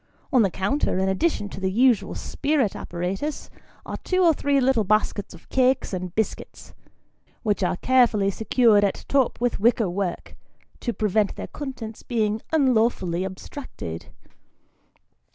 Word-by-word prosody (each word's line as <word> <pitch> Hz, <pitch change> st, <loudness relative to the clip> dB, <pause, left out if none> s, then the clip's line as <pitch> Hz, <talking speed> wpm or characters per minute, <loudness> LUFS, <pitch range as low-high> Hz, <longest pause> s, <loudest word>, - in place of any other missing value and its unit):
On 255 Hz, -, +6 dB
the 200 Hz, -, +3 dB
counter, 195 Hz, -, -1 dB
in 190 Hz, 0 st, +1 dB
addition 205 Hz, -, 0 dB
to 190 Hz, -, -8 dB
the 190 Hz, 0 st, 0 dB
usual 240 Hz, +2 st, +3 dB
spirit 280 Hz, -7 st, -1 dB
apparatus, 190 Hz, -, -4 dB, 0.3 s
are -, -, -5 dB
two 370 Hz, 0 st, 0 dB
or 335 Hz, -2 st, +6 dB
three 285 Hz, -1 st, +1 dB
little 255 Hz, -4 st, +3 dB
baskets 205 Hz, -1 st, 0 dB
of 170 Hz, -, -18 dB
cakes 260 Hz, -4 st, +2 dB
and 185 Hz, -1 st, -4 dB
biscuits, 220 Hz, -1 st, -4 dB, 0.7 s
which 210 Hz, -3 st, 0 dB
are 180 Hz, -1 st, 0 dB
carefully 225 Hz, -6 st, +3 dB
secured 220 Hz, 0 st, +3 dB
at 200 Hz, -, -1 dB
top 270 Hz, -3 st, +1 dB
with 245 Hz, -3 st, 0 dB
wicker 220 Hz, -3 st, +2 dB
work, 185 Hz, -1 st, -4 dB, 0.4 s
to 240 Hz, -, -2 dB
prevent 210 Hz, -2 st, 0 dB
their -, -, -5 dB
contents 245 Hz, -6 st, -7 dB
being 220 Hz, -2 st, -1 dB
unlawfully 230 Hz, -, +2 dB
abstracted. 190 Hz, -, -7 dB
220 Hz, 140 wpm, -24 LUFS, 190-260 Hz, 0.7 s, On